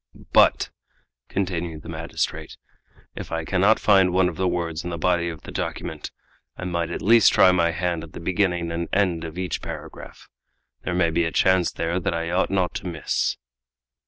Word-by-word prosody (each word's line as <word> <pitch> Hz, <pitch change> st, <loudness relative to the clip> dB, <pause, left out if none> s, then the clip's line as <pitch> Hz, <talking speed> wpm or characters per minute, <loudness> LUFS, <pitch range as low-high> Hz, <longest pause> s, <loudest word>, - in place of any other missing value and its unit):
"But," -, -, +4 dB, 0.6 s
continued 85 Hz, -5 st, -3 dB
the -, -, -11 dB
magistrate, -, -, -4 dB, 0.6 s
"if -, -, -7 dB
I 80 Hz, -1 st, -2 dB
cannot 100 Hz, +5 st, +3 dB
find 95 Hz, -3 st, +4 dB
one 90 Hz, 0 st, +3 dB
of 85 Hz, -, -8 dB
the 95 Hz, +2 st, 0 dB
words 85 Hz, -3 st, -2 dB
in 90 Hz, -, -4 dB
the 85 Hz, -, -4 dB
body 85 Hz, 0 st, +1 dB
of 80 Hz, -2 st, -8 dB
the -, -, -9 dB
document, -, -, -4 dB, 0.5 s
I 95 Hz, -, -6 dB
might 85 Hz, -2 st, -2 dB
at -, -, -5 dB
least 115 Hz, +2 st, +6 dB
try 95 Hz, -, +6 dB
my 85 Hz, -2 st, +2 dB
hand 85 Hz, 0 st, -2 dB
at 85 Hz, -, -12 dB
the -, -, -7 dB
beginning 90 Hz, -1 st, 0 dB
and 85 Hz, 0 st, -3 dB
end 90 Hz, -4 st, +1 dB
of 80 Hz, +1 st, -7 dB
each 90 Hz, -3 st, -3 dB
paragraph. -, -, -9 dB, 0.5 s
There 90 Hz, -, -3 dB
may 85 Hz, -2 st, +2 dB
be 85 Hz, +1 st, +1 dB
a 80 Hz, -, -2 dB
chance 95 Hz, -1 st, +3 dB
there 85 Hz, +2 st, -2 dB
that 95 Hz, -1 st, -1 dB
I 85 Hz, 0 st, -2 dB
ought 90 Hz, +2 st, +1 dB
not 95 Hz, -2 st, 0 dB
to -, -, -7 dB
miss." 85 Hz, -3 st, -1 dB
85 Hz, 190 wpm, -24 LUFS, 85-95 Hz, 0.6 s, least